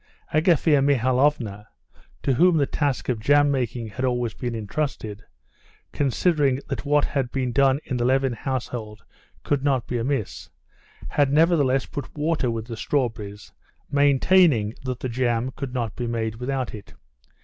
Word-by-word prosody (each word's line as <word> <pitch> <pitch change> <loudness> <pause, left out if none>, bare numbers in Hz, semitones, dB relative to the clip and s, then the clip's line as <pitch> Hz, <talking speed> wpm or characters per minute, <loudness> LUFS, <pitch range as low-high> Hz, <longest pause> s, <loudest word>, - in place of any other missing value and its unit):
Agafea 155 -2 +3
Mihalovna, 130 -5 +1 0.6
to 135 - +2
whom 175 +6 +4
the 145 - +3
task 140 -2 -1
of 125 -4 -1
jam 145 +5 +4
making 125 -3 -2
had 125 +5 -5
always 120 -3 0
been 120 -2 -4
intrusted, 110 -2 -4 0.7
considering 145 -1 +1
that - - -4
what 145 0 +3
had 135 -4 -2
been 130 -2 -1
done 135 +2 +3
in 130 - -2
the 120 - 0
Levin 130 +1 +2
household 120 -3 -5 0.4
could 140 -2 0
not 135 -4 +1
be 120 - -2
amiss, 110 - -3 0.6
had 145 -2 +2
nevertheless 145 -4 +3
put 145 +1 -8
water 150 -4 0
with 115 -1 -3
the 115 -1 -6
strawberries, 110 -7 -3 0.4
maintaining 140 - +4
that 130 -2 -4
the - - -2
jam 120 0 0
could 140 -3 -5
not 120 -4 -3
be 120 - -3
made 110 -1 -2
without 130 0 -3
it. 105 -2 -11
130 Hz, 150 wpm, -24 LUFS, 115-145 Hz, 0.7 s, whom